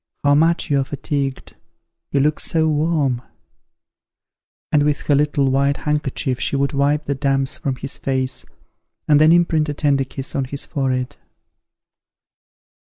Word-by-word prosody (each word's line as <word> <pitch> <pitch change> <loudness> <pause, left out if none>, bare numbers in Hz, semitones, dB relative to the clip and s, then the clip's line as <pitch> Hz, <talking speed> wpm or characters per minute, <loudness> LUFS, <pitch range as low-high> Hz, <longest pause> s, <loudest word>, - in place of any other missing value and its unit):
How 145 0 +4
much 165 +1 +2
you 140 - +3
are - - +1
fatigued, 140 -1 -4 0.5
you 140 - +1
look 150 +2 +1
so 160 -1 +1
warm!" 150 -5 +1 1.5
and 150 - +4
with 145 0 +1
her 145 - +1
little 145 -1 +2
white 140 +1 +1
handkerchief 145 -3 -2
she - - -1
would 140 +1 0
wipe 145 +2 +1
the 140 - -1
damps 135 -1 -1
from 135 -2 -2
his 135 +2 -4
face, 130 -1 -2 0.6
and 150 -1 +5
then 155 +1 +6
imprint 165 -3 +3
a 145 - -3
tender 140 -2 +1
kiss 135 0 -6
on 135 - 0
his 140 +2 -4
forehead. 130 -2 -2
140 Hz, 150 wpm, -20 LUFS, 135-150 Hz, 1.5 s, then